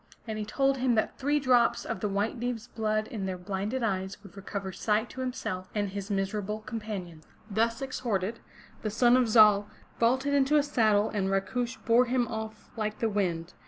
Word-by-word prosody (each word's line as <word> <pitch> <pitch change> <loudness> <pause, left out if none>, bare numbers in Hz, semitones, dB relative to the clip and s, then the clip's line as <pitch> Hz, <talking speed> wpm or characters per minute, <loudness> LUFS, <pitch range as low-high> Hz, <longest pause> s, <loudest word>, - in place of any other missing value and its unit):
And 215 -1 -3
he 210 - -3
told 270 +4 +1
him 250 -2 +2
that 220 - 0
three 290 +2 +2
drops 240 -3 +3
of - - -3
the 210 - -1
White 205 +5 -1
Deev's 240 -2 -3
blood 215 -1 -1
in 200 -4 -4
their 185 -1 -3
blinded 200 +7 -3
eyes 190 -3 -1
would 200 -1 -14
recover 195 -1 -5
sight 215 +4 0
to 260 - -6
himself 215 -8 -4
and 205 -1 0
his 200 +1 -6
miserable 205 +1 -2
companions. 200 -8 -6 0.2
Thus 230 +4 +1
exhorted, 230 -5 -2 0.4
the 215 - -2
son 240 +3 +4
of 255 -3 +3
Zal 210 -2 +6 0.3
vaulted 260 +4 +2
into 280 +1 +3
his 290 -1 +3
saddle 215 -4 +3
and 195 -3 0
Rakush 235 +6 -1
bore 235 +1 +5
him 245 -1 +1
off 220 -1 -6
like 215 -2 -2
the 225 - 0
wind. 180 -4 -1
215 Hz, 190 wpm, -29 LUFS, 200-245 Hz, 0.4 s, Zal